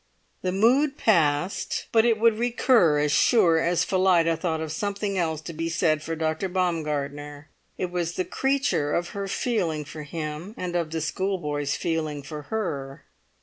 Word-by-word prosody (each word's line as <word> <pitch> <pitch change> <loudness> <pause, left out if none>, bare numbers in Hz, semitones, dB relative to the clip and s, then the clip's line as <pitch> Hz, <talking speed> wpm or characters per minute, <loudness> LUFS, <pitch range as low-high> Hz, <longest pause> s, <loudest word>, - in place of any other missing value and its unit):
The 185 - -1
mood 260 +9 +3
passed, 165 -3 +1
but 225 0 +4
it 230 -2 +3
would 225 -1 +3
recur 235 - +3
as 145 0 +1
sure 165 - +4
as 170 +1 +1
Phillida 180 -3 +3
thought 160 -1 -2
of 160 -1 -4
something 200 +3 -2
else 160 -4 -1
to 170 - -7
be 165 +1 -3
said 160 -2 +1
for 165 +1 -4
Dr. 160 +4 -1
Baumgartner; 150 -4 -2 0.3
it 180 -1 -3
was 175 -1 -2
the 185 - -2
creature 270 - 0
of 175 0 -1
her 200 -1 -4
feeling 180 -9 -1
for 155 +2 -8
him, 155 +6 -6
and 180 -1 -4
of 170 -2 0
the 160 0 -3
schoolboy's 150 -5 -2
feeling 155 -3 -2
for 150 +1 -7
her. 145 -8 -4
165 Hz, 165 wpm, -25 LUFS, 155-195 Hz, 0.3 s, but